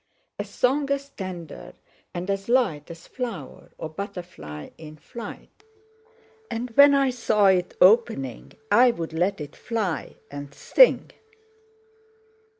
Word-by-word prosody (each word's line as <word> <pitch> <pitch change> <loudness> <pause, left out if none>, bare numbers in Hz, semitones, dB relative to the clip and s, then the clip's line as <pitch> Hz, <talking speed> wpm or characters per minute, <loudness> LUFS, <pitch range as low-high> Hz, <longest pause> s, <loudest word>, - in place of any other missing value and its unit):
A - - 0
song 275 +3 0
as 280 0 -2
tender 185 - -8 0.4
and 175 +1 -5
as 195 +2 -4
light 220 - +1
As 170 0 -11
flower, 230 - -7
or - - -5
butterfly 165 - -8
in 155 -1 -11
flight; 235 - -10 0.9
And 235 +2 -4
when 280 +4 +7
I 275 -2 +3
saw 220 -4 +1
it 180 -1 +1
opening, 180 - +3 0.2
I'd 240 +3 +5 0.2
let 175 +4 0
it 145 -1 -8
fly 215 -7 -3 0.2
and 145 0 -8
sing!" - - +4
195 Hz, 120 wpm, -25 LUFS, 160-245 Hz, 0.9 s, when